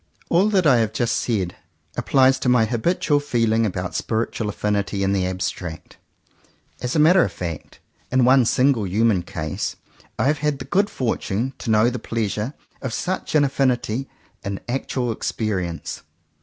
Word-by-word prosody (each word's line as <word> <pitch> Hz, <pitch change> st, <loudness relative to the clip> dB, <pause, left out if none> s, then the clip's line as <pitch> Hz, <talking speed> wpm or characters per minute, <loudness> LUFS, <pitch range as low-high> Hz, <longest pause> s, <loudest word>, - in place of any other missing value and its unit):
All 185 Hz, +5 st, +4 dB
that 190 Hz, -4 st, +2 dB
I 135 Hz, -5 st, +6 dB
have 110 Hz, -2 st, 0 dB
just 120 Hz, 0 st, 0 dB
said 95 Hz, -7 st, -1 dB, 0.4 s
applies 130 Hz, -1 st, +3 dB
to 125 Hz, -, 0 dB
my 125 Hz, -3 st, +4 dB
habitual 145 Hz, -, +1 dB
feeling 115 Hz, -5 st, +1 dB
about 90 Hz, -2 st, -4 dB
spiritual 110 Hz, -1 st, -2 dB
affinity 100 Hz, -1 st, -1 dB
in 95 Hz, 0 st, +1 dB
the 95 Hz, -2 st, +1 dB
abstract. 90 Hz, -2 st, -5 dB, 0.8 s
As 125 Hz, +4 st, -2 dB
a -, -, +3 dB
matter 170 Hz, +4 st, +6 dB
of -, -, -2 dB
fact, 85 Hz, -4 st, -6 dB, 0.3 s
in 130 Hz, -1 st, +4 dB
one 130 Hz, 0 st, +5 dB
single 125 Hz, -3 st, +2 dB
human 105 Hz, 0 st, +2 dB
case, 80 Hz, -3 st, -4 dB, 0.4 s
I -, -, +1 dB
have 145 Hz, +1 st, +2 dB
had 150 Hz, -1 st, 0 dB
the 130 Hz, -, -7 dB
good 200 Hz, +2 st, +2 dB
fortune 115 Hz, 0 st, -2 dB
to -, -, -5 dB
know 110 Hz, +2 st, +4 dB
the 125 Hz, -, -4 dB
pleasure 110 Hz, +3 st, -2 dB, 0.3 s
of 130 Hz, -4 st, -3 dB
such 185 Hz, -3 st, -3 dB
an 150 Hz, -, +5 dB
affinity 130 Hz, -2 st, 0 dB, 0.3 s
in 100 Hz, -2 st, -3 dB
actual 125 Hz, -1 st, -2 dB
experience. 95 Hz, -7 st, -3 dB
115 Hz, 160 wpm, -22 LUFS, 100-135 Hz, 0.8 s, I